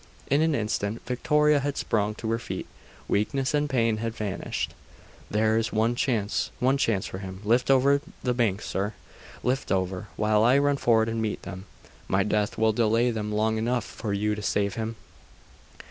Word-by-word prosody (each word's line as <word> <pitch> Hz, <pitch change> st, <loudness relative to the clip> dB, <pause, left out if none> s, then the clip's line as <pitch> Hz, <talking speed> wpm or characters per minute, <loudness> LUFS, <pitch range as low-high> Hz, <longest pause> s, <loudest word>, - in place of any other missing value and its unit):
In 140 Hz, +2 st, +4 dB
an 160 Hz, -2 st, +2 dB
instant 105 Hz, -1 st, -2 dB
Victoria 150 Hz, +4 st, +3 dB
had 140 Hz, 0 st, -2 dB
sprung 105 Hz, -1 st, 0 dB
to 110 Hz, 0 st, -3 dB
her 115 Hz, -, 0 dB
feet -, -, -5 dB, 0.4 s
weakness 130 Hz, +7 st, 0 dB
and 150 Hz, 0 st, +1 dB
pain 115 Hz, -4 st, +2 dB
had 115 Hz, +1 st, -3 dB
vanished. 105 Hz, -3 st, -3 dB, 0.6 s
'There 110 Hz, +1 st, +2 dB
is 115 Hz, +1 st, -2 dB
one 110 Hz, +2 st, +2 dB
chance 115 Hz, -4 st, 0 dB
one 130 Hz, +2 st, +3 dB
chance 110 Hz, -8 st, +1 dB
for 95 Hz, -, -6 dB
him! 95 Hz, -1 st, -7 dB
Lift 120 Hz, +5 st, +2 dB
over 140 Hz, +1 st, +4 dB, 0.2 s
the 125 Hz, -, +1 dB
bank, 110 Hz, -5 st, 0 dB
sir! 105 Hz, +2 st, -2 dB, 0.5 s
Lift 130 Hz, +2 st, -1 dB
over, 95 Hz, +1 st, -1 dB
while 105 Hz, 0 st, +2 dB
I 125 Hz, +4 st, +5 dB
run 145 Hz, 0 st, +2 dB
forward 115 Hz, -3 st, +3 dB
and 115 Hz, 0 st, -2 dB
meet 110 Hz, -2 st, -2 dB
them. 95 Hz, 0 st, -7 dB, 0.4 s
My 95 Hz, +1 st, +2 dB
death 105 Hz, 0 st, 0 dB
will 110 Hz, 0 st, +3 dB
delay 115 Hz, +2 st, +2 dB
them 105 Hz, -2 st, -3 dB
long 110 Hz, +1 st, +1 dB
enough 120 Hz, 0 st, 0 dB
for 105 Hz, -, -5 dB
you 105 Hz, +1 st, 0 dB
to 105 Hz, -, -4 dB
save 100 Hz, -1 st, 0 dB
him! 115 Hz, +2 st, -3 dB
110 Hz, 180 wpm, -26 LUFS, 105-125 Hz, 0.6 s, I